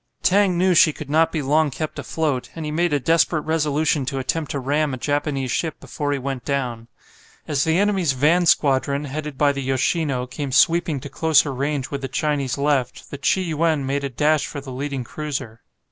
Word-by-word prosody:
Tang 190 -2 +3
knew 185 +1 +3
she 160 -2 +5
could 145 -1 -8
not 160 +1 +3
be 155 -3 -2
long 150 +3 +2
kept 155 +3 -5
afloat, 150 -6 -2
and 165 -2 -5
he 150 - -3
made 170 +3 +1
a 145 - +2
desperate 165 +3 +2
resolution 155 -1 +1
to 135 - -2
attempt 145 +4 -2
to 140 - -2
ram 145 +1 0
a - - -8
Japanese 145 -1 -1
ship 160 -3 -2
before 145 -1 -4
he 145 - 0
went 135 -1 -4
down. 125 -5 -3 0.6
As 145 -2 0
the 160 +1 +2
enemy's 195 -7 +2
van 160 +7 +3
squadron, 140 0 +2
headed 150 0 -5
by 145 0 +4
the 140 -1 -4
"Yoshino," 135 0 0
came 140 +2 -5
sweeping 165 +2 +3
to 145 - -7
closer 150 -3 +2
range 140 0 -2
with 140 -1 -4
the 135 - -3
Chinese 140 -1 -1
left 140 -3 -1
the 140 - -6
"Chi 190 +6 +2
yuen" 160 -4 0
made 140 +1 -1
a 140 - -2
dash 150 +4 +1
for 145 - -6
the 135 -1 -9
leading 135 0 -4
cruiser. 130 -5 -6
145 Hz, 205 wpm, -22 LUFS, 135-160 Hz, 0.6 s, she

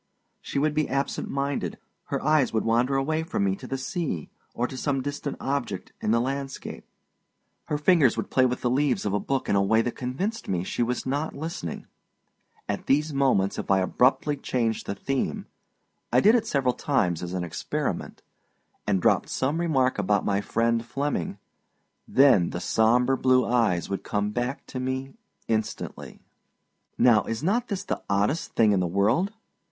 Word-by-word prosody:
She - - -5
would 150 +2 +2
be 155 0 0
absent 140 +1 -2
minded, 140 +1 -2 0.3
her - - -2
eyes 155 -3 +3
would 110 - 0
wander 120 +4 +2
away 155 +4 0
from 160 - -2
me 95 -1 +1
to 130 - -9
the 135 - -2
sea, 135 - -3 0.2
or 120 - 0
to 130 - -6
some 135 0 -1
distant 145 0 -4
object 135 -9 -3
in - - -1
the 115 +2 +4
landscape; 135 +2 -4 0.8
her 150 - -1
fingers 150 -4 +4
would - - -3
play 130 -1 +4
with 125 0 -3
the 120 - +1
leaves 135 -2 +1
of 100 - 0
a 105 - +2
book 135 +4 -2
in - - +2
a 100 - +4
way 110 +3 +3
that 120 - -1
convinced 185 - -3
me 90 -2 -1
she 95 - -3
was 125 +1 -1
not 145 +4 -2
listening. 150 - -5 0.8
At 100 - -3
these 150 +2 +2
moments 130 -8 +2
if - - -5
I 95 - +5
abruptly 130 +9 +2
changed 115 -4 -1
the 100 - -2
theme 135 +3 -2 0.7
I 125 - +5
did 210 - +6
it 240 -2 +2
several 135 -3 +1
times 90 - 0
as 90 0 -5
an 90 - -1
experiment 85 - -4 0.6
and 95 -3 +1
dropped - - +3
some 140 +5 0
remark 130 -8 +1
about 105 0 +1
my 100 0 +1
friend 115 +2 +1
Flemming, 140 +5 -2 0.7
then 125 -11 +5
the 90 - -4
sombre 120 +8 +3
blue 130 -2 +3
eyes 115 -8 +1
would 100 -1 -3
come 105 0 -1
back 120 +5 -3
to 130 - -6
me 130 +1 -3 0.3
instantly. 110 -1 -3 0.8
Now, 115 -3 +5
is 115 +4 -4
not 230 +8 +1
this 200 -3 -3
the - - -3
oddest 100 +11 0
thing 110 -2 +5
in 100 - +3
the 90 - +1
world? 105 - +1
130 Hz, 180 wpm, -26 LUFS, 105-140 Hz, 0.8 s, did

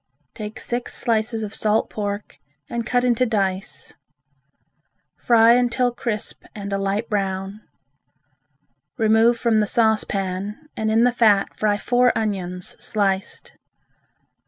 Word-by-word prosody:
Take 210 0 -7
six 240 0 -3
slices 225 -1 0
of 210 0 -6
salt 215 0 +1
pork 205 0 -5 0.3
and 235 -1 -4
cut 245 0 +1
into 245 0 +2
dice. 200 -4 -2 1.2
Fry 230 -1 +5
until 245 0 +2
crisp 225 -3 -4
and 200 -1 -5
a 195 - 0
light 200 +3 -1
brown. 195 0 -3 1.4
Remove 225 +1 +4
from 230 -2 +1
the 210 -1 +2
saucepan 205 -3 0 0.2
and 220 0 -1
in 225 +2 +3
the 245 - +4
fat 215 -5 +3
fry 210 -1 +1
four 245 +3 +3
onions 180 -4 -3
sliced. 195 -3 -1
215 Hz, 120 wpm, -22 LUFS, 200-235 Hz, 1.4 s, Fry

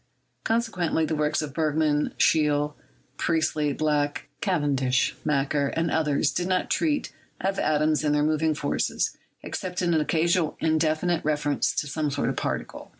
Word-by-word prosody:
Consequently 210 -8 0
the 160 - -2
works 150 +1 0
of 145 -2 -6
Bergman, 155 -1 +1
Scheele, 150 -1 +2 0.4
Priestley, 155 -3 +1
Black, 145 -1 -1
Cavendish, 140 - +1
Macquer, 140 -1 +1
and 165 0 0
others 150 -3 +1
do 175 - -1
not 185 0 0
treat 300 -3 0 0.3
of 195 +1 -1
atoms 155 0 +2
and 150 -1 +2
their 150 - +2
moving 155 0 +1
forces, 145 -1 -1 0.3
except 180 -1 -4
in 175 -2 +1
an 160 - +3
occasional 165 +1 +1
indefinite 160 +2 +1
reference 145 -1 +1
to - - 0
some 150 +1 -2
sort 145 - -1
of - - -2
particle. - - -4
155 Hz, 150 wpm, -26 LUFS, 150-165 Hz, 0.4 s, an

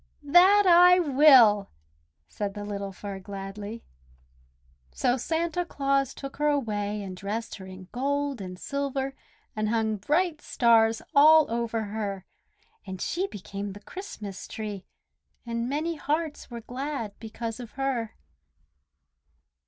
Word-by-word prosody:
"That 365 +7 +6
I 360 0 +7
will!" 265 - +6 0.6
said 200 - -4
the 205 0 -5
little 200 -1 -4
Fir 195 0 -7
gladly. 200 +3 -7 1.1
So 245 - +1
Santa 330 +6 -1
Claus 275 -4 0
took 275 -1 -8
her 295 +1 +1
away 210 -7 -1
and 190 -2 -7
dressed 210 +5 -4
her 190 -2 -10
in 185 -1 -11
gold 280 -1 -1
and 180 -1 -7
silver 275 +3 -3 0.4
and 215 0 -1
hung 220 -1 0
bright 305 - 0
stars 225 -2 +3
all 310 +2 +7
over 230 -1 -1
her; 200 -2 -4 0.6
and 190 -2 -7
she 370 - -1
became 200 - -6
the 205 - -10
Christmas 215 - -8
Tree, 210 -3 -6 0.6
and 235 +1 -3
many 315 +4 -2
hearts 305 +1 -2
were 235 -1 -7
glad 250 -2 -5
because 225 +1 -6
of 240 -3 -9
her. 260 -5 -2
235 Hz, 130 wpm, -27 LUFS, 205-285 Hz, 1.1 s, I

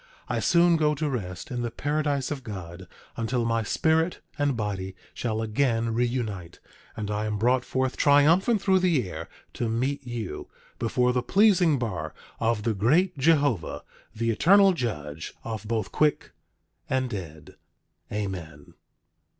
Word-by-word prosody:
I - - -1
soon 170 -1 +4
go 150 -1 +2
to 155 +1 -1
rest 95 -9 -5
in 125 -1 -2
the 120 - -2
paradise 145 +2 -1
of 140 -3 -4
God, 95 -5 -8 0.3
until 115 +1 -1
my 115 0 +1
spirit 160 +9 +1 0.2
and 145 -4 0
body 95 -3 -3 0.2
shall 110 -2 -2
again 115 0 0
reunite, 115 -7 -2 0.4
and 105 -1 -3
I 105 +1 -1
am 105 -1 -2
brought 125 +4 +2
forth 130 0 -1
triumphant 165 +10 +4
through 190 -1 +4
the 165 - +2
air, 80 -2 -7 0.2
to 120 - -2
meet 130 +5 -1
you 120 -5 -5 0.3
before 125 +2 +1
the 125 - +1
pleasing 185 - +4
bar 90 -11 -4 0.2
of 115 -2 0
the 115 0 +1
great 155 - +2
Jehovah, 140 - +2 0.3
the 115 +1 0
Eternal 195 - +5
Judge 80 - -4
of 110 -2 -5
both 115 -1 -2
quick 150 -1 +1 0.6
and 130 -1 +1
dead. 85 -9 -8 0.5
Amen. 90 -8 -5
120 Hz, 145 wpm, -26 LUFS, 105-145 Hz, 0.6 s, Eternal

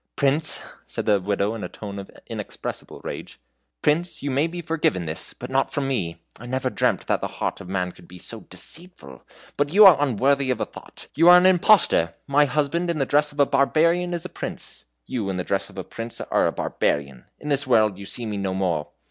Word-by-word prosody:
"Prince," 145 +2 +2 0.3
said - - -4
the 100 -2 +3
Widow, 100 +2 0
in 115 - -6
a - - -4
tone 100 -2 -7
of 100 - -9 0.2
inexpressible - - -6
rage, - - -7 0.4
"Prince, 170 +3 0
you 140 - -1
may 140 +5 +2
be 175 +1 -7
forgiven 155 - 0
this, 80 0 -5
but - - -8
not - - +1
from 140 -1 -1
me! 85 -11 -3 0.2
I 120 - -9
never 130 0 -1
dreamt 100 - 0
that - - 0
the - - -1
heart - - -4
of 90 - -10
man 90 -2 -1
could 85 - -18
be 90 - -12
so - - -4
deceitful, 165 - -6 0.4
but 145 0 +1
you 205 +4 +8
are 165 -7 +8
unworthy 135 +1 +2
of 125 -3 0
a - - 0
thought. - - -13
You 165 +4 +5
are 180 - +10
an 180 - +4
impostor! 180 - +4
My 145 +1 +4
husband 150 +5 0
in 170 - 0
the 135 - +1
dress 150 +2 +2
of 145 - -13
a 140 - +6
barbarian 170 +6 +2
is 170 +1 -5
a - - -5
prince; - - -7 0.2
you 105 - -3
in 95 - -2
the 90 - -2
dress 100 +1 -1
of - - -15
a 95 - -3
prince 115 +4 -7
are - - +1
a - - 0
barbarian. 70 -3 -2
In 150 - -6
this 140 -1 +1
world 110 -5 +3
you 100 - -8
see 120 - -1
me 105 -2 -3
no 95 -1 -2
more!" 85 -6 -1
130 Hz, 225 wpm, -24 LUFS, 100-155 Hz, 0.4 s, are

